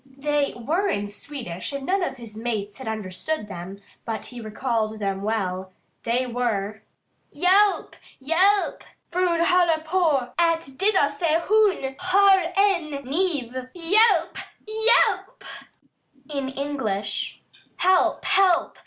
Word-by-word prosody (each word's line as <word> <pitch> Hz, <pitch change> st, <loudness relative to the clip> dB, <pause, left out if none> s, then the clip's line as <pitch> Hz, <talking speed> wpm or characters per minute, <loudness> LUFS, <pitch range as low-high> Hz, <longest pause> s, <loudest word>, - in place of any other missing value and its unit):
They 280 Hz, +1 st, -2 dB
were 320 Hz, -, -1 dB
in 205 Hz, -, -1 dB
Swedish 205 Hz, -5 st, -7 dB
and 280 Hz, -1 st, -5 dB
none 385 Hz, +4 st, +1 dB
of 310 Hz, -, -2 dB
his 230 Hz, -3 st, -10 dB
mates 215 Hz, -2 st, -4 dB
had 260 Hz, -, -8 dB
understood 215 Hz, -, -4 dB
them, 190 Hz, 0 st, -8 dB, 0.2 s
but 225 Hz, -1 st, -4 dB
he 245 Hz, -1 st, -8 dB
recalled 220 Hz, 0 st, -2 dB
them 195 Hz, -2 st, -2 dB
well. 190 Hz, -3 st, -2 dB, 0.3 s
They 245 Hz, +2 st, +1 dB
were: 220 Hz, -4 st, -2 dB, 0.5 s
"Hjelp! 390 Hz, +3 st, +3 dB, 0.3 s
Hjelp! 370 Hz, +9 st, +2 dB, 0.3 s
Frun 350 Hz, -1 st, +1 dB
håller 345 Hz, -3 st, +3 dB
på 315 Hz, -7 st, +1 dB
alb 335 Hz, -1 st, +3 dB, 0.2 s
döda 390 Hz, -7 st, +3 dB
sig. 320 Hz, +2 st, 0 dB
Hon 405 Hz, -11 st, +2 dB
har 385 Hz, +1 st, +5 dB, 0.2 s
en 380 Hz, -6 st, +2 dB
knif. 285 Hz, -3 st, -1 dB, 0.2 s
Hjelp! 400 Hz, +7 st, +3 dB, 0.3 s
Hjelp!" 455 Hz, +3 st, +2 dB, 0.9 s
In 275 Hz, -2 st, -2 dB
English: 265 Hz, -8 st, -3 dB, 0.4 s
"Help! 370 Hz, 0 st, +2 dB
Help! 380 Hz, -3 st, +2 dB
280 Hz, 120 wpm, -24 LUFS, 220-365 Hz, 0.9 s, har